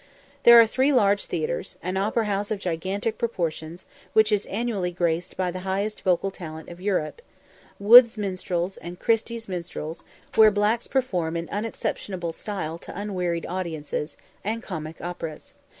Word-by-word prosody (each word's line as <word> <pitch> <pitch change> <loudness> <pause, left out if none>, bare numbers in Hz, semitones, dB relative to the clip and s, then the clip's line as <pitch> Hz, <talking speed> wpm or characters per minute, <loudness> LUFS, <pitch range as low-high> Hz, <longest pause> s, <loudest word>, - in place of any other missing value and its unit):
There 235 0 +10
are 230 - +8
three 260 +5 +2
large 205 -6 +3
theatres; 475 -1 -3
an 185 +2 -2
opera 215 +4 +1
house 205 0 -1
of 215 - -1
gigantic 190 +4 -2
proportions, 170 -6 -3 0.3
which 220 0 +5
is 210 -1 +1
annually 210 -4 -1
graced 175 0 -1
by 185 -1 0
the 185 - -5
highest 195 +3 -2
vocal 190 +1 +1
talent 160 -4 -9
of 175 +1 -11
Europe; 195 - -1 0.6
Wood's 235 +3 +8
minstrels, 185 -2 -2
and 175 +1 -9
Christy's 230 0 0
minstrels, 170 -3 -6 0.3
where 220 -1 +8
blacks 210 +3 +1
perform 180 -11 0
in 170 0 -4
unexceptionable 195 -4 -3
style 170 -5 -5
to 180 - -8
unwearied 180 -5 -2
audiences; 160 -4 -4 0.3
and 225 +3 -2
comic 160 -4 -6
operas. 175 - -6
190 Hz, 150 wpm, -25 LUFS, 170-215 Hz, 0.6 s, There